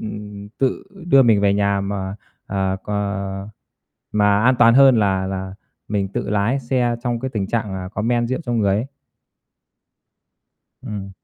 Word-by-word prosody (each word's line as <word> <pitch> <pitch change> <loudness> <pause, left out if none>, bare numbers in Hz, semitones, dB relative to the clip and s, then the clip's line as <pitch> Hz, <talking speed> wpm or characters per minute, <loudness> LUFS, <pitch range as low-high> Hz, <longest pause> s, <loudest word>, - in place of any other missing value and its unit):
ừm, 105 -1 -7
tự 130 -2 0 0.2
đưa 135 -5 +6
mình 110 -5 +4
về 100 -1 +3
nhà 100 -1 +1
mà, 100 0 -4 0.3
à, 95 -1 -1
cò 100 -1 -3 0.7
mà 105 0 +3
an 130 +2 +5
toàn 115 -1 +6
hơn 135 -1 +7
là 95 -2 +1
là 95 0 -5 0.3
mình 100 -2 -1
tự 100 - -4
lái 105 +6 +1
xe 120 -1 0
trong 120 -2 -2
cái 130 - -3
tình 105 -5 -2
trạng 105 -2 -2
là 95 -1 -5
có 105 +2 -4
men 120 +1 +1
rượu 130 - -2
trong 120 -1 0
người 100 -3 +2
ấy. 110 +5 -2 2.0
Ừm. 100 -2 -6
105 Hz, 165 wpm, -20 LUFS, 100-120 Hz, 2.0 s, hơn